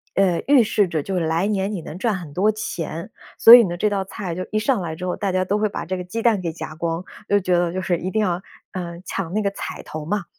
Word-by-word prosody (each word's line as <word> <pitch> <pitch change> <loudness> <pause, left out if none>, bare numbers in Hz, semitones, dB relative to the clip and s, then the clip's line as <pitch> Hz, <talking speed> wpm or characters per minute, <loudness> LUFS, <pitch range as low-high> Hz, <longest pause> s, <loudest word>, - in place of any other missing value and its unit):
呃， 185 -3 +3
预 280 -2 +6
示 210 -3 +2
着 160 -3 -1
就 185 +4 -2
来 165 +3 0
年 200 0 -1
你 180 - -4
能 155 - -8
赚 215 +1 0
很 170 -6 -7
多 195 +7 +2
钱。 170 -3 -5 0.3
所 230 - +11
以 245 - +8
呢， 175 -4 -2
这 210 +4 +1
道 200 -2 -1
菜 190 -3 -5
就 185 +1 -4
一 215 - +1
上 230 -3 +1
来 160 -2 -4
之 180 +3 -6
后， 180 - -1
大 200 -3 -2
家 185 0 +1
都 200 +3 0
会 215 0 +1
把 205 - -5
这 185 - -3
个 180 - -4
鸡 225 +6 -4
蛋 225 -4 +3
给 170 -2 -2
夹 155 -2 -7
光， 165 +2 -2 0.2
都 205 - +3
觉 180 -2 +1
得 175 -1 0
就 185 - -2
是 175 -1 0
一 185 +3 -4
定 220 - +1
要， 180 -2 -1 0.3
呃， 170 -2 -5
抢 185 -3 -4
那 215 - +1
个 200 - +1
彩 200 - -6
头 155 -1 -7
嘛。 200 +4 -2
185 Hz, 300 characters per minute, -22 LUFS, 170-210 Hz, 0.3 s, 所